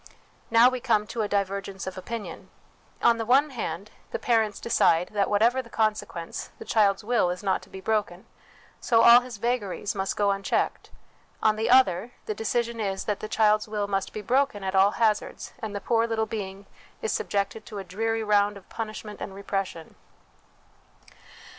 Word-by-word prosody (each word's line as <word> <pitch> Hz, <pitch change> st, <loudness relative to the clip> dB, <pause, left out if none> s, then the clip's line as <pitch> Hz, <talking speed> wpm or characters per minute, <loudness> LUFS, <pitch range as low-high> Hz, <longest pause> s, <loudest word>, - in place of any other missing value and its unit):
Now 230 Hz, +2 st, +7 dB
we 255 Hz, 0 st, 0 dB
come 225 Hz, -4 st, +1 dB
to 225 Hz, +1 st, -4 dB
a 210 Hz, -, 0 dB
divergence 195 Hz, -1 st, -2 dB
of 190 Hz, -, -5 dB
opinion: 225 Hz, +3 st, -7 dB, 0.5 s
on 235 Hz, -1 st, +4 dB
the -, -, 0 dB
one 270 Hz, +6 st, +3 dB
hand, 215 Hz, -5 st, -5 dB, 0.2 s
the -, -, -3 dB
parents 220 Hz, -4 st, +1 dB
decide 180 Hz, -6 st, +2 dB
that, 205 Hz, -2 st, 0 dB
whatever 230 Hz, +5 st, +3 dB
the 235 Hz, -, -16 dB
consequence, 215 Hz, -7 st, -2 dB
the -, -, -10 dB
child's 205 Hz, -2 st, +2 dB
will 230 Hz, -5 st, +2 dB
is 180 Hz, +3 st, -4 dB
not 195 Hz, -, +1 dB
to -, -, -16 dB
be 190 Hz, -, -9 dB
broken, 205 Hz, -3 st, -1 dB, 0.5 s
so 230 Hz, -1 st, +3 dB
all 235 Hz, +1 st, +9 dB
his 250 Hz, -3 st, -9 dB
vagaries 210 Hz, -3 st, -2 dB
must 195 Hz, -2 st, -2 dB
go 205 Hz, -1 st, +3 dB
un 195 Hz, 0 st, -2 dB
checked; -, -, -1 dB, 0.5 s
on 215 Hz, -1 st, +4 dB
the 220 Hz, +1 st, -1 dB
other, 245 Hz, -3 st, +4 dB
the 215 Hz, -, -2 dB
decision 230 Hz, +2 st, -2 dB
is, 195 Hz, -2 st, -2 dB
that 210 Hz, -2 st, -2 dB
the 215 Hz, -, -6 dB
child's 215 Hz, -1 st, +3 dB
will 210 Hz, -1 st, -2 dB
must 195 Hz, -1 st, -2 dB
be 215 Hz, -, -6 dB
broken 255 Hz, -5 st, +1 dB
at 190 Hz, 0 st, -2 dB
all 195 Hz, +1 st, +4 dB
hazards, 220 Hz, -2 st, 0 dB
and 220 Hz, -4 st, -5 dB
the -, -, -2 dB
poor 230 Hz, +2 st, +1 dB
little 225 Hz, -1 st, 0 dB
being 200 Hz, -2 st, -6 dB, 0.4 s
is 220 Hz, -, 0 dB
subjected 200 Hz, +2 st, -2 dB
to 210 Hz, -, -8 dB
a 195 Hz, -, -4 dB
dreary 225 Hz, +5 st, -2 dB
round 205 Hz, -1 st, +2 dB
of 195 Hz, -, -16 dB
punishment 215 Hz, -1 st, -6 dB
and 195 Hz, -, -6 dB
repression. 195 Hz, -4 st, -4 dB
210 Hz, 185 wpm, -26 LUFS, 195-230 Hz, 0.5 s, all